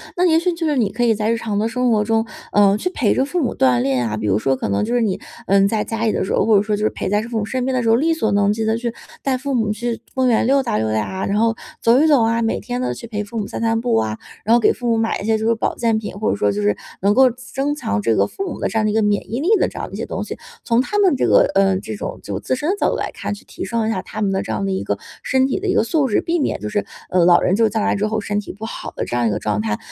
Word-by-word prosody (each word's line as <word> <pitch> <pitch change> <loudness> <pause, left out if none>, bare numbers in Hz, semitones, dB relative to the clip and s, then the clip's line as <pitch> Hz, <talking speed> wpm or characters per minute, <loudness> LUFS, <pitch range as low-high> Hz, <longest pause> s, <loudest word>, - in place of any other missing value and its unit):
那 360 - +2
也 325 -2 +4
许 360 +2 0
就 335 0 -3
是 300 - +1
你 220 -5 +2
可 240 +3 -1
以 235 -2 +4
在 215 +1 0
日 230 - +1
常 215 -3 -2
的 220 - +1
生 250 +1 +1
活 215 -2 +3
中， 225 +1 +1 0.3
呃， 200 -1 +5
去 365 - -1
陪 255 - +1
着 - - +1
父 320 +6 -2
母 270 - -1
锻 125 -2 +3
炼 125 -2 0
啊， 110 - -3
比 110 - -4
如 105 0 +2
说 135 +3 +1
可 130 - -3
能 100 -1 0
就 235 +3 -1
是 245 - +2
你， 205 -5 0 0.3
嗯， 195 0 +4
在 215 +1 0
家 225 0 -3
里 220 - +2
的 - - -1
时 - - -2
候， - - +2
或 220 -2 +5
者 200 - +3
说 210 0 0
就 210 - -3
是 215 - +3
陪 - - -5
在 205 +2 +1
父 230 0 -4
母 205 - -1
身 255 +3 -2
边 260 0 -1
的 250 - 0
时 230 - -1
候， 225 - +6
力 315 +7 +2
所 220 -10 0
能 200 0 +3
及 220 +1 -1
地 220 +1 +1
去 235 0 -2 0.3
带 265 -2 0
父 275 +2 -3
母 220 -4 +1
去 235 +2 -3
公 260 -1 +2
园 230 -1 +2
溜 275 +1 +3
达 235 - -1
溜 110 0 -1
达 110 0 +1
啊， 190 0 -4
然 200 +1 0
后 225 0 +2 0.3
走 235 +3 +5
一 315 - +4
走 280 -7 +5
啊， 230 +1 +1
每 225 - 0
天 245 0 -4
都 255 - -1
去 - - -9
陪 210 -2 -4
父 225 +3 -8
母 210 - -1
散 - - -6
散 225 0 +1
步 245 +1 0
啊， 110 -1 -1 0.3
然 225 +2 +4
后 - - +5
给 225 - +3
父 245 - -5
母 230 - +2
买 225 0 0
一 - - -6
些 220 0 +2
就 220 - -2
是 230 - +4
保 225 - -2
健 225 -2 +1
品， 210 - -6
或 215 - +1
者 - - 0
说 100 0 +1
就 105 +1 -2
是， 105 0 +2 0.3
能 200 +2 +3
够 260 +3 +6
增 260 +4 -3
强 105 - -2
这 110 +2 +1
个 100 - +3
父 385 - -5
母 - - -7
的 - - 0
这 220 - -1
样 - - +1
的 215 - +2
一 - - -1
个 220 - +3
免 205 0 0
疫 235 - -1
力 330 +8 0
的 - - +3
这 - - -10
样 - - -3
的 - - -14
一 - - -4
些 - - -3
东 - - -4
西。 - - -7 0.3
从 235 0 +2
他 415 +10 -2
们 385 -7 +4
这 - - +1
个， - - +5
呃， 195 -1 +3
这 215 - -6
种 - - -6
就 - - -4
自 - - -1
身 295 +5 -2
的 390 - +2
角 - - +2
度 - - -1
来 - - -3
看， - - -4
去 205 - -10
提 - - -7
升 230 -2 -1
一 - - +1
下 185 - -2
他 215 +3 -7
们 200 -2 +1
的 190 - 0
这 - - -5
样 100 -2 -2
的 95 - -1
一 95 0 -1
个 100 0 -2 0.3
身 260 0 +2
体 270 - -1
的 400 - -4
一 375 - +2
个 - - +3
素 285 +3 +1
质， 210 - +1
避 340 0 -1
免 285 - 0
就 - - -4
是， 210 -1 -1 0.2
呃， 180 -2 +3
老 175 0 +6
人 - - +2
就 225 +2 +3
是 - - +2
将 220 0 -1
来 - - +1
之 210 +1 0
后 215 0 -1
身 205 0 -2
体 210 - -7
不 215 +2 -8
好 225 - -6
的 - - -2
这 - - -4
样 120 -1 +2
一 - - +1
个 105 - -1
状 105 -1 -1
态。 105 -1 -1
220 Hz, 380 characters per minute, -20 LUFS, 200-245 Hz, 0.3 s, 候